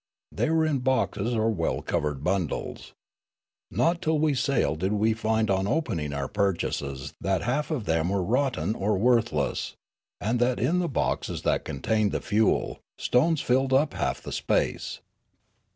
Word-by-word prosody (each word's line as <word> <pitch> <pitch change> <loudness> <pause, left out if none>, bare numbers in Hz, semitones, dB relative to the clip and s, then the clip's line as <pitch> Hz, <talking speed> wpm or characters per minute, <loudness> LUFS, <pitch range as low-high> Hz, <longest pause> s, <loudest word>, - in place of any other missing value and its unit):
They - - 0
were 160 0 +3
in 150 -4 +1
boxes 120 -3 0
or 110 0 +2
well 85 -6 -1
covered 75 -2 -2
bundles. 90 -3 -2 0.8
Not 170 +1 +1
till 160 0 +1
we 155 0 +2
had 135 - 0
sailed 80 - +1
did 95 +4 0
we 110 +2 +2
find 110 -1 0
on 95 0 +1
opening 110 - -1
our 70 -1 -2
purchases 85 -9 -2
that 95 -2 0
half 135 +7 -1
of 145 -10 -2
them 80 0 +1
were 100 -1 0
rotten 110 - 0
or 105 -1 0
worthless, 115 - +1 0.4
and 115 +4 0
that 120 +1 +2
in 160 +10 +2
the 175 - 0
boxes 135 - -1
that - - +1
contained 105 +9 0
the - - 0
fuel, 110 -1 +1 0.2
stones 155 +5 +2
filled 130 +1 +2
half 140 +3 +1
the - - -6
space. - - -1
110 Hz, 160 wpm, -26 LUFS, 95-130 Hz, 0.8 s, were